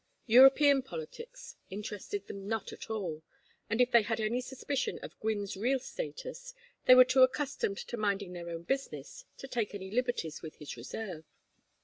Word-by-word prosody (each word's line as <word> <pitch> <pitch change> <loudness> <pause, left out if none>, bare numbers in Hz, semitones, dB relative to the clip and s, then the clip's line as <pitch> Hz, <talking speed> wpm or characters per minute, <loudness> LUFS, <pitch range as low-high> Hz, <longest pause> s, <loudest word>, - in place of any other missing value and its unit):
European 270 +3 +7
politics 270 - -9
interested 205 0 -5
them 195 -1 -8
not 220 -1 -2
at - - -10
all, 180 -8 -3 0.5
and 220 +2 0
if 250 0 +4
they 235 -1 +7
had 225 +1 -2
any 225 +3 0
suspicion 265 +1 -3
of - - -10
Gwynne's 205 -3 -2
real 245 +7 +1
status, - - -7 0.3
they 255 - +9
were 255 0 +9
too 260 +1 +3
accustomed 260 -6 +2
to 240 - -5
minding 200 -3 -1
their 170 -1 -6
own 165 0 -5
business 275 - -4
to 270 - -8
take 230 -5 -2
any 190 -1 -7
liberties 240 -9 -1
with 160 -2 -8
his 150 - -8
reserve. 160 - -6
225 Hz, 165 wpm, -32 LUFS, 195-265 Hz, 0.5 s, they